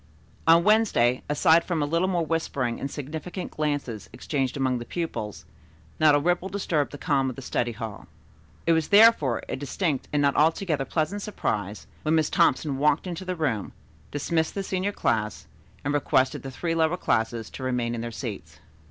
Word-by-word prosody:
On 165 Hz, +1 st, +7 dB
Wednesday, 205 Hz, -, +3 dB
aside 160 Hz, +3 st, +4 dB
from 165 Hz, -4 st, -1 dB
a -, -, +1 dB
little 170 Hz, +5 st, +1 dB
more 175 Hz, -3 st, 0 dB
whispering 140 Hz, -7 st, -1 dB
and 140 Hz, -, -3 dB
significant 160 Hz, +6 st, -6 dB
glances 145 Hz, -8 st, -3 dB
exchanged 135 Hz, -3 st, -2 dB
among 130 Hz, -2 st, 0 dB
the -, -, -5 dB
pupils, 120 Hz, -, -5 dB, 0.5 s
not 155 Hz, -2 st, +6 dB
a -, -, +4 dB
ripple 175 Hz, +4 st, 0 dB
disturbed 170 Hz, -7 st, -1 dB
the 145 Hz, -, -7 dB
calm 135 Hz, -2 st, +1 dB
of 130 Hz, -, -6 dB
the 135 Hz, -, -8 dB
study 120 Hz, -1 st, -1 dB
hall. 110 Hz, -1 st, -7 dB, 0.6 s
It 170 Hz, -, +3 dB
was 160 Hz, -2 st, +1 dB
therefore 205 Hz, -, +5 dB
a -, -, -3 dB
distinct 145 Hz, +1 st, -2 dB
and 150 Hz, -, +1 dB
not 140 Hz, -1 st, +2 dB
altogether 155 Hz, -2 st, +2 dB
pleasant 170 Hz, +8 st, -1 dB
surprise 105 Hz, -, -3 dB, 0.2 s
when 155 Hz, +1 st, +1 dB
Miss 155 Hz, -2 st, +1 dB
Thompson 155 Hz, -5 st, +2 dB
walked 150 Hz, +3 st, +2 dB
into 180 Hz, 0 st, -5 dB
the 185 Hz, 0 st, -2 dB
room, 135 Hz, -, -2 dB, 0.4 s
dismissed 160 Hz, +3 st, -1 dB
the 195 Hz, -, -2 dB
senior 190 Hz, +1 st, -1 dB
class 110 Hz, -, -1 dB, 0.4 s
and 145 Hz, -, 0 dB
requested 135 Hz, -2 st, +1 dB
the 135 Hz, -, -6 dB
three 165 Hz, +6 st, -2 dB
lower 165 Hz, +1 st, +2 dB
classes 110 Hz, -6 st, -1 dB
to -, -, -9 dB
remain 125 Hz, -2 st, -1 dB
in 115 Hz, -, -3 dB
their 120 Hz, -, -4 dB
seats. 100 Hz, -, -7 dB
145 Hz, 180 wpm, -26 LUFS, 125-170 Hz, 0.6 s, On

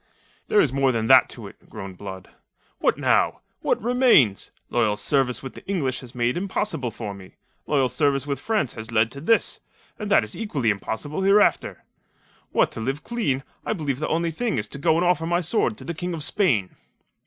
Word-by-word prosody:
"There 210 Hz, -, +3 dB
is 135 Hz, -8 st, +3 dB
more 135 Hz, -1 st, +2 dB
than 115 Hz, -2 st, -1 dB
that -, -, +6 dB
to -, -, -9 dB
it," -, -, -14 dB
groaned 95 Hz, -2 st, -9 dB
Blood. 95 Hz, -2 st, -8 dB, 0.5 s
"What -, -, +2 dB
now? -, -, +2 dB, 0.2 s
What -, -, 0 dB
remains? 240 Hz, -, +4 dB, 0.2 s
Loyal 105 Hz, -1 st, +1 dB
service 125 Hz, +2 st, 0 dB
with 130 Hz, -, -7 dB
the -, -, -12 dB
English 140 Hz, -10 st, -1 dB
was 125 Hz, -1 st, -11 dB
made 120 Hz, +4 st, 0 dB
impossible 180 Hz, -, -2 dB
for 110 Hz, -2 st, -6 dB
me. 95 Hz, -1 st, -13 dB, 0.3 s
Loyal 135 Hz, -3 st, +2 dB
service 140 Hz, 0 st, +1 dB
with 140 Hz, -1 st, -3 dB
France 215 Hz, -, -1 dB
has 110 Hz, 0 st, -7 dB
led 110 Hz, 0 st, +2 dB
to 140 Hz, -, -8 dB
this; 225 Hz, +8 st, +2 dB, 0.4 s
and 210 Hz, -2 st, -4 dB
that 195 Hz, -, +5 dB
is 105 Hz, -, -5 dB
equally 145 Hz, -, 0 dB
impossible 110 Hz, -, -4 dB
hereafter. 200 Hz, +2 st, +3 dB, 0.7 s
What -, -, +2 dB
to -, -, -7 dB
live 135 Hz, +6 st, -3 dB
clean, 145 Hz, -, -1 dB, 0.2 s
I -, -, -1 dB
believe 145 Hz, -9 st, -3 dB
the 155 Hz, -, -2 dB
only 165 Hz, +1 st, 0 dB
thing 230 Hz, +7 st, -2 dB
is -, -, -1 dB
to 140 Hz, -, -6 dB
go 160 Hz, +3 st, +3 dB
and 175 Hz, -, +1 dB
offer 175 Hz, -2 st, +1 dB
my 175 Hz, +1 st, +2 dB
sword 205 Hz, +5 st, 0 dB
to -, -, -8 dB
the 170 Hz, -, -4 dB
King 175 Hz, +1 st, -4 dB
of 155 Hz, -, -2 dB
Spain." 130 Hz, -, +1 dB
140 Hz, 200 wpm, -24 LUFS, 115-180 Hz, 0.7 s, that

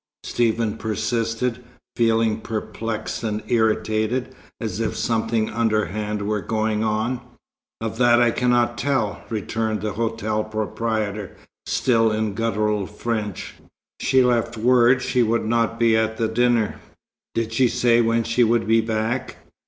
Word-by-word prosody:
Stephen 115 Hz, -2 st, 0 dB
persisted, 115 Hz, +3 st, -2 dB, 0.3 s
feeling 115 Hz, -2 st, +2 dB
perplexed 110 Hz, 0 st, -4 dB
and 110 Hz, -1 st, -2 dB
irritated, 110 Hz, +2 st, +1 dB, 0.3 s
as 110 Hz, -2 st, -4 dB
if 115 Hz, -, -2 dB
something 110 Hz, -1 st, 0 dB
underhand 105 Hz, -2 st, -1 dB
were 105 Hz, 0 st, -1 dB
going 110 Hz, 0 st, -1 dB
on. 110 Hz, +3 st, -1 dB, 0.6 s
"Of 110 Hz, 0 st, -4 dB
that 120 Hz, -1 st, +5 dB
I 120 Hz, -1 st, +4 dB
cannot 120 Hz, -1 st, +1 dB
tell," 130 Hz, -7 st, -1 dB
returned 110 Hz, 0 st, -2 dB
the 105 Hz, 0 st, -2 dB
hotel 110 Hz, -1 st, -1 dB
proprietor, 110 Hz, -1 st, -3 dB, 0.3 s
still 115 Hz, -3 st, +2 dB
in 110 Hz, -1 st, -1 dB
guttural 105 Hz, -2 st, 0 dB
French. 105 Hz, -2 st, -4 dB, 0.5 s
"She 130 Hz, -1 st, +3 dB
left 120 Hz, -2 st, +1 dB
word 125 Hz, +2 st, +4 dB
she 125 Hz, -, +1 dB
would 115 Hz, 0 st, +1 dB
not 115 Hz, 0 st, +1 dB
be 115 Hz, -1 st, +4 dB
at 110 Hz, 0 st, 0 dB
the 115 Hz, -, +1 dB
dinner." 120 Hz, -1 st, +1 dB, 0.6 s
"Did 115 Hz, -1 st, -1 dB
she 125 Hz, +2 st, +4 dB
say 120 Hz, 0 st, +3 dB
when 115 Hz, 0 st, +2 dB
she 115 Hz, +2 st, +2 dB
would 115 Hz, 0 st, +2 dB
be 115 Hz, +1 st, +4 dB
back?" 110 Hz, +3 st, -2 dB
115 Hz, 135 wpm, -22 LUFS, 110-120 Hz, 0.6 s, that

